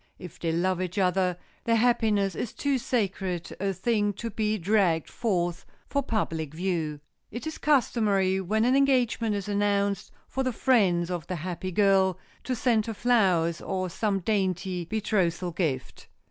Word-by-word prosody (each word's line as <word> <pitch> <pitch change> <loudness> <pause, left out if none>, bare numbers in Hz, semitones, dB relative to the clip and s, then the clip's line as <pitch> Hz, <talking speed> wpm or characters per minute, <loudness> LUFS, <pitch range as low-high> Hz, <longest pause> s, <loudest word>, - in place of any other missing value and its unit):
If 180 -3 -11
they 165 - -1
love 180 +2 0
each 185 +2 -4
other, 185 -1 +2 0.3
their 230 - +3
happiness 220 -4 +2
is 220 - -4
too 280 -2 0
sacred 195 -7 -2
a 195 +1 0
thing 205 +2 0
to 230 +3 -5
be 215 +1 0
dragged 185 -4 +2
forth 175 -6 -1 0.2
for 280 - 0
public 160 - -2
view. 165 -4 -2 0.3
It 240 +6 -7
is 315 - -5
customary, 205 -9 +2
when 215 +4 +1
an 255 +2 +3
engagement 250 -5 +2
is 200 -1 -4
announced, 200 -1 0 0.2
for 265 - -3
the 255 -2 0
friends 185 -9 +2
of 175 -3 -4
the 185 - -3
happy 180 +2 -4
girl 190 -1 +3 0.3
to 255 - -1
send 230 -2 +1
her 225 - -3
flowers, 185 -9 +2
or 185 -2 -3
some 200 0 -1
dainty 185 -3 -1
betrothal 185 -4 0
gift. 155 -7 -3
195 Hz, 160 wpm, -27 LUFS, 180-220 Hz, 0.3 s, their